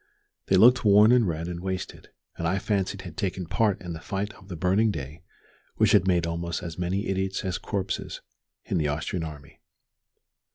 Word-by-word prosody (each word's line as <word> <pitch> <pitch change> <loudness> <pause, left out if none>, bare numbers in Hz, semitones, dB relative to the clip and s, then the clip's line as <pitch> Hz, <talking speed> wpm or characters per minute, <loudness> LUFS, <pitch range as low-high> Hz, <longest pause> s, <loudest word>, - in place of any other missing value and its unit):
They 95 - +3
looked 125 +7 +6
worn 105 +1 +6
and 120 -4 +4
red 85 0 -3
and 90 -1 -5
wasted, 95 0 -5 0.3
and 85 - -2
I 95 +3 +1
fancied 100 -1 -1
had 85 -3 -9
taken 95 -1 -2
part 100 +3 +1
in 90 -2 -6
the 80 - -7
fight 100 +4 -4
of 95 -2 -17
the 90 - -6
burning 95 +7 +2
day 75 -3 -6 0.5
which - - +3
had 95 -2 +4
made 90 -3 +2
almost 85 +1 -3
as 85 -1 -6
many 95 +4 -1
idiots 95 0 -2
as 95 - -2
corpses 95 -3 -3 0.5
in - - -1
the 75 - +1
Austrian 80 +4 -2
army. 75 -3 -9
95 Hz, 190 wpm, -26 LUFS, 85-100 Hz, 0.5 s, looked